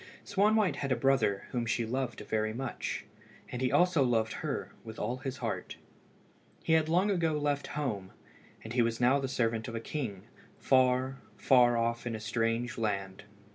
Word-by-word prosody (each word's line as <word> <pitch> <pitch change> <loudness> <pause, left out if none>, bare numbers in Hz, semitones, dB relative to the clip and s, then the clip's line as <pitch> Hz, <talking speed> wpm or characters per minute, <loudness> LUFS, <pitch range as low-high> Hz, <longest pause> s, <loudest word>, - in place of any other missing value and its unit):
Swanwhite 205 +1 +2
had 140 -2 -3
a - - +4
brother 130 -5 +2
whom 120 -2 -1
she 115 0 0
loved 125 +1 -3
very 110 0 -1
much, 130 -1 -4 0.4
and 125 - -5
he 130 - +1
also 180 -3 +4
loved 115 -4 +2
her - - -3
with 110 -1 -9
all 125 - -2
his 135 +1 -5
heart. 115 -5 -4 0.9
He 160 - +2
had 160 -1 +3
long 185 +5 +3
ago 165 -4 +1
left 145 -1 -1
home, 105 -10 -2 0.5
and 110 - -7
he 125 - +3
was 115 0 0
now 125 +3 +4
the 135 - -2
servant 115 -3 -1
of 115 - -5
a - - -1
king, 115 -7 -4 0.3
far, 130 0 +2 0.2
far 120 -2 +5
off 115 +1 -1
in 115 - -2
a - - -5
strange 115 +2 -1
land. 100 -3 -2
125 Hz, 175 wpm, -31 LUFS, 115-140 Hz, 0.9 s, far